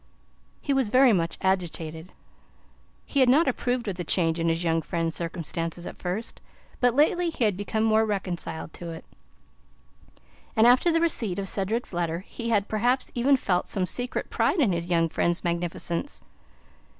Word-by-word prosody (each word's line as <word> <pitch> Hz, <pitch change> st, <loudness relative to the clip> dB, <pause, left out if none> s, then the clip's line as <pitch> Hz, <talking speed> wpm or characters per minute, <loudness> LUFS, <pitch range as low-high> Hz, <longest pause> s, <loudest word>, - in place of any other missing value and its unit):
He 280 Hz, -, 0 dB
was 265 Hz, -5 st, +1 dB
very 255 Hz, 0 st, +5 dB
much 170 Hz, -3 st, 0 dB
agitated. 170 Hz, -3 st, -2 dB, 0.9 s
He 280 Hz, -, -1 dB
had 260 Hz, -2 st, +5 dB
not 295 Hz, +6 st, +5 dB
approved 245 Hz, -2 st, -1 dB
of 190 Hz, -3 st, -3 dB
the 175 Hz, -, -3 dB
change 165 Hz, -1 st, +1 dB
in 165 Hz, 0 st, +1 dB
his 165 Hz, +1 st, 0 dB
young 165 Hz, -1 st, +1 dB
friend's 165 Hz, -1 st, -2 dB
circumstances 170 Hz, 0 st, -4 dB
at -, -, -7 dB
first, 190 Hz, +6 st, -4 dB, 0.4 s
but 245 Hz, -1 st, +3 dB
lately 340 Hz, +4 st, +3 dB
he 310 Hz, -, -2 dB
had 210 Hz, -4 st, +2 dB
become 205 Hz, +3 st, -2 dB
more 220 Hz, 0 st, +4 dB
reconciled 185 Hz, -6 st, -3 dB
to 170 Hz, -, -7 dB
it, 165 Hz, -1 st, -8 dB, 1.5 s
and 220 Hz, -, +5 dB
after 255 Hz, +8 st, +5 dB
the 330 Hz, 0 st, +2 dB
receipt 230 Hz, -, 0 dB
of 195 Hz, -1 st, -3 dB
Cedric's 205 Hz, +4 st, -1 dB
letter 170 Hz, 0 st, -1 dB
he 230 Hz, +4 st, -6 dB
had 205 Hz, -3 st, +2 dB
perhaps 245 Hz, +4 st, 0 dB
even 265 Hz, +3 st, +3 dB
felt 180 Hz, -7 st, 0 dB
some 190 Hz, -2 st, 0 dB
secret 245 Hz, +6 st, -3 dB
pride -, -, +1 dB
in 245 Hz, -10 st, +3 dB
his 170 Hz, 0 st, -3 dB
young 165 Hz, -2 st, +2 dB
friend's 170 Hz, +2 st, 0 dB
magnificence. 170 Hz, -, -2 dB
195 Hz, 170 wpm, -26 LUFS, 170-245 Hz, 1.5 s, very